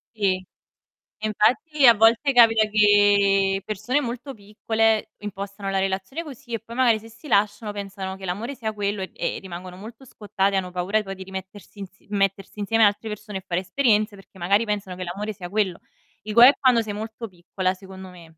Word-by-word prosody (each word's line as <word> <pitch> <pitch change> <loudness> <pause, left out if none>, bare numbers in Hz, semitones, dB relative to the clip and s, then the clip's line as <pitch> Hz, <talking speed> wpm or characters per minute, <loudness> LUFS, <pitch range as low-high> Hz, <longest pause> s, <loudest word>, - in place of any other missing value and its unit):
Sì, 185 -3 0 0.8
infatti 255 +8 +2
a 235 - +8
volte 225 +6 +4
capita 225 -3 +5
che 205 -2 +4
persone 215 +7 -1
molto 250 +1 -5
piccole 220 +1 0
impostano 200 -1 -6
la 195 0 0
relazione 195 - -3
così 275 -5 -11
e 230 - -2
poi 230 +2 -11
magari 235 -4 +3
se 225 - -13
si 230 +7 -16
lasciano 210 -1 +1
pensano 195 -2 -6
che 190 0 -11
l'amore 215 +9 -4
sia 220 -3 -4
quello 205 -1 -2
e, 190 - -6
ehm, - - -3
rimangono 180 -1 -9
molto 225 +7 -11
scottate, 200 -4 -2
hanno 185 -1 -1
paura 185 +4 0
poi 195 -1 -7
di 190 - -9
rimettersi 190 +2 -10
ins 195 - -9
mettersi 195 0 -1
insieme 225 +2 +3
ad 205 - +7
altre 215 +2 -9
persone 210 -1 -6
e 185 - -13
fare 180 -1 -1
esperienze, 215 -2 +1
perché 195 -1 -17
magari 200 +6 +2
pensano 205 -3 -3
che 185 - -8
l'amore 200 +5 -4
sia 180 -2 -9
quello. 195 -3 -1 0.4
Il 215 - -6
guaio 240 +4 +9
è - - -2
quando 250 -3 +4
sei 215 -2 -4
molto 220 +2 -6
piccola, 185 0 -3
secondo 190 0 -11
me. 175 -2 -14
205 Hz, 195 wpm, -23 LUFS, 195-225 Hz, 0.8 s, guaio